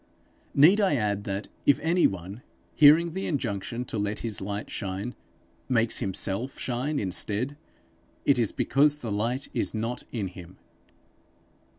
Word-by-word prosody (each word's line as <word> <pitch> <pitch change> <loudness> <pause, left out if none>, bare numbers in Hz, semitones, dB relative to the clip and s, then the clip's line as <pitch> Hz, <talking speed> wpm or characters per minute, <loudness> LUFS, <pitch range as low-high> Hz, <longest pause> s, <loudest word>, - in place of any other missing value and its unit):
Need 175 +10 +7
I 190 -7 +3
add 105 -4 -1
that, 100 -1 -3 0.2
if 145 - +5
any 170 +3 +4
one, 95 +4 -7 0.3
hearing 155 +3 +6
the 190 +2 -3
injunction 120 - -2
to 110 - -4
let 105 +1 -2
his 110 -3 -3
light 100 +2 -4
shine, 100 +5 -4 0.6
makes 115 -3 +2
himself 100 +6 -2
shine 130 +4 -2
instead, 105 +7 -1 0.7
it 140 -3 +4
is 115 -4 +2
because 145 +2 +3
the 120 -7 -6
light 115 +6 -1
is - - -1
not 115 +3 -2
in 105 -6 -3
him! 90 0 -12
115 Hz, 145 wpm, -27 LUFS, 100-140 Hz, 0.7 s, Need